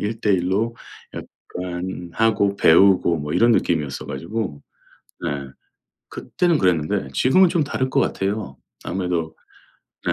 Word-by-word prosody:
1:1 105 -4 0
로 115 +4 -1 0.4
약간 90 0 -7
하고 100 -1 +1
배우고 90 0 +5
뭐 75 +1 -4
이런 120 +1 +4
느낌이었어 75 - -1
가지고 85 0 -5 0.6
네 - - -2 0.8
그때는 175 -3 0
그랬는데 80 -6 0
지금은 175 - +4
좀 170 -3 +1
다를 130 -2 -2
것 135 - +1
같아요. 100 - -2 0.3
아무래도 90 -4 -2 0.7
네. - - +2
95 Hz, 250 characters per minute, -21 LUFS, 85-115 Hz, 0.8 s, 배우고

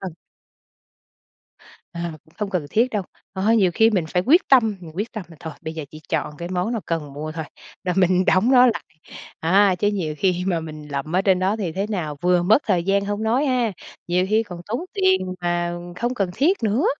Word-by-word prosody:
Ừ. 185 -4 -5 1.8
À, 170 0 -4
cũng 160 - -25
không 210 -2 -2
cần 175 -6 -2
thiết 235 +4 +2
đâu. 205 -3 -1 0.3
À, 200 +4 +2
nhiều 190 -6 +4
khi 225 0 +5
mình 185 -7 0
phải 180 +2 0
quyết 325 +9 +6
tâm, 225 -6 +5
mình 165 -3 -10
quyết 210 +4 -3
tâm 215 -4 -5
là 165 - -14
thôi 160 -3 -7
bây 160 - -5
giờ 160 -2 -5
chỉ 155 - -10
chọn 150 -2 -2
cái 170 +1 -6
món 185 +5 -1
nào 225 -4 -2
cần 155 -4 -3
mua 155 +2 -5
thôi, 160 -1 -5 0.4
là 180 - 0
mình 185 0 +3
đóng 205 +7 +3
nó 255 -1 +7
lại, 235 - +1 0.6
à, 190 +3 +4
chứ 205 +3 0
nhiều 175 -7 -1
khi 180 0 +1
mà 170 -3 +1
mình 155 -2 -8
lậm 145 +4 -3
ở 190 - +4
trên 190 -2 +3
đó 190 +3 +1
thì 180 -6 -2
thế 195 +4 -2
nào 155 -8 -3
vừa 180 0 +3
mất 220 - +5
thời 180 -5 +1
gian 200 +1 +1
hông 205 +2 -2
nói 245 +6 +2
ha, 250 -5 +1 0.4
nhiều 180 +1 +2
khi 220 +1 +3
còn 175 -4 -9
tốn 235 +6 -2
tiền 375 - +1
mà 175 0 0 0.2
không 240 +4 -1
cần 195 -7 -1
thiết 340 - +2
nữa. 225 - +1
185 Hz, 225 wpm, -22 LUFS, 170-220 Hz, 1.8 s, nó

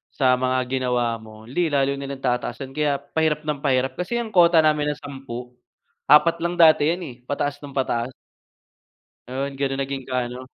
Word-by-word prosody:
sa 130 -2 +4
mga 130 0 +1
ginawa 125 -3 0
mo, 110 0 -13
‘di 170 +8 0
lalo 140 0 +2
nilang 135 -1 -6
tataasan 130 +2 -2
kaya 150 -2 +1
pahirap 150 +1 -1
nang 150 -2 -2
pahirap 130 -2 +1
kasi 180 +7 -2
ang 230 -2 -4
kota 170 -2 +6
namin 150 -1 +2
na - - -14
10, 125 -3 -8 0.6
4 165 +3 +6
lang 170 +1 -1
dati 155 -2 +6
‘yan 175 +2 -2
eh, 130 - -8
pataas 145 0 -2
nang 145 - -8
pataas. 125 -2 0 1.2
Yun, 135 +2 -4
ganun 135 0 -1
naging 135 -1 -4
ka 125 -1 -2
ano. 125 +1 -8
140 Hz, 175 wpm, -23 LUFS, 130-150 Hz, 1.2 s, kota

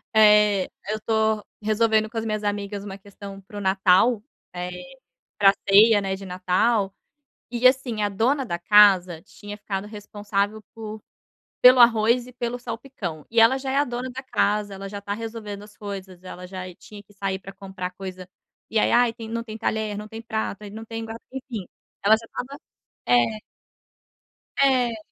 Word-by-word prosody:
eh, 210 -2 +6 0.2
eu 215 - 0
estou 220 -1 0 0.2
resolvendo 215 0 +2
com 230 - -8
as 225 - -2
minhas 215 -1 -2
amigas 205 0 -3
uma 195 -1 -7
questão 200 0 -11
para 205 +2 -12
o - - -4
Natal, 195 +4 +3 0.3
eh, 180 0 -4 0.7
pra 195 -1 +6 0.2
ceia, 205 +1 +7
né, 190 -1 -2
de 195 0 -10
Natal, 190 +3 +1 0.6
e, 240 +1 -2
assim, 255 -4 +1
a 205 - +1
dona 255 +7 +1
da 170 -5 -3
casa 185 -4 +5
tinha 205 0 -10
ficado 195 -1 -4
responsável 205 0 -3
por 215 -1 -7 0.6
pelo 250 0 +8
arroz 235 +1 +5
e - - -11
pelo 245 0 -3
salpicão. 225 - -6
E 230 0 +2
ela 230 +4 +6
já 265 0 -4
é - - -1
a 285 - +4
dona 245 +1 -4
da 265 +2 -7
casa, 210 -5 0
ela 195 +1 -7
já 200 0 -7
tá 200 0 -4
resolvendo 215 -2 -6
as 210 0 -15
coisas, 190 -3 -8
ela 180 0 -9
já 185 -1 -7
tinha 205 -1 -13
que 205 +1 -23
sair 195 -1 -2
pra 195 +1 -10
comprar 190 -2 -6
coisa, 185 -1 -8 0.4
e 220 - +1
ai: - - +2
"Ai, 240 -1 +4
tem 225 -1 -9
não 230 0 -3
tem 220 -1 -8
talher, 215 -2 -2
não 210 0 -7
tem 225 +1 -8
prato, 220 -3 -3
não 220 +1 -8
tem 225 0 -6
guar 225 0 -7 0.2
enfim, 250 -8 -6 0.4
ela 220 +2 +7
já 230 - -12
estava 280 +4 -7 0.5
é." 225 -3 +3 1.2
É. 250 -4 +3
210 Hz, 180 wpm, -24 LUFS, 195-230 Hz, 1.2 s, pelo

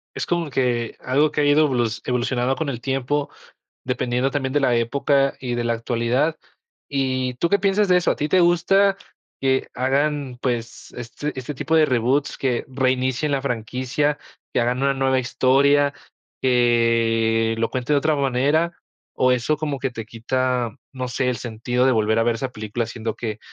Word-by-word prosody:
Es - - -3
como 170 -3 -1
que 120 -3 0
algo 145 +4 +1
que 150 - 0
ha - - +2
ido 145 +2 +5
evolu 125 -4 +1 0.2
evolucionando 125 +1 0
con 160 -3 -3
el 120 -3 -5
tiempo, 135 +2 -1 0.5
dependiendo 125 +1 0
también 135 -2 -2
de 145 - +3
la 130 -3 +2
época 135 +3 +1
y 125 -2 -3
de 120 - -1
la 115 0 +1
actualidad. 120 +6 0 0.5
¿Y 130 -2 -1
tú 170 +7 0
qué 200 - +4
piensas 200 +1 +2
de 180 - +5
eso? 180 - +2
¿A - - -2
ti 150 - -2
te 185 - +4
gusta 195 +3 +3 0.5
que 130 0 +1
hagan, 135 0 0
pues, 120 -2 -3
este 120 +5 -5
este 130 +3 -6
tipo 160 +4 0
de 160 -1 +6
reboots 130 +3 0
que 125 -3 -1
reinicien 130 +2 0
la 140 - 0
franquicia, 130 +4 -1 0.3
que - - +2
hagan 125 +3 0
una 140 0 +3
nueva 135 -1 +1
historia, 140 +3 +3 0.5
que 115 -2 +2
lo 115 0 0
cuenten 130 +3 0
de 140 - +4
otra 155 +1 +1
manera 140 +5 +1 0.4
o 130 0 +3
eso 125 +5 +1
como 145 -3 -3
que 135 - -1
te 115 -3 -7
quita, 125 +1 -1 0.2
no 130 -2 -4
sé, 125 +1 -1
el 120 - -2
sentido 120 +2 -1
de 130 - +4
volver 110 -1 +2
a 115 - +3
ver 120 -1 +1
esa 130 +3 -4
película, 110 +1 -3
siendo 115 -1 -5
que 110 -2 -5
130 Hz, 185 wpm, -22 LUFS, 120-145 Hz, 0.5 s, de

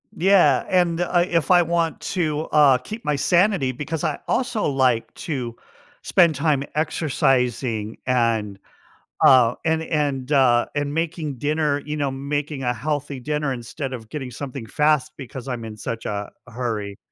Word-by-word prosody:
Yeah, 175 -8 +4
and, 175 -2 +2
uh 175 0 +2
if 165 -2 +1
I 180 -1 +7
want 170 -1 0
to, 155 -5 -1
uh, 145 -4 +5
keep 215 - -8
my 150 - +1
sanity 175 -1 +2
because 150 +4 -5
I - - -1
also 245 -4 0
like 130 -4 +1
to 125 -7 -4 0.5
spend 170 -4 +3
time 150 -4 +1
exercising 125 -7 0
and, 115 -5 0 0.7
uh, 125 -2 +6
and 160 0 +1
and, 145 -4 -1
uh, 125 -4 +4
and 145 -1 -1
making 165 -2 -2
dinner, 150 +1 0
you 150 0 -4
know, 140 -2 0
making 140 +1 -3
a 120 -1 +1
healthy 145 +2 -3
dinner 150 +1 -1
instead 130 +3 -6
of 115 -4 -7
getting 135 -1 -6
something 130 0 -7
fast 150 +3 +1
because 130 -1 -8
I'm 120 -3 -4
in 110 -1 -8
such 115 +1 -5
a 100 -1 -4 0.2
hurry. 110 -4 -4
140 Hz, 155 wpm, -22 LUFS, 125-155 Hz, 0.7 s, I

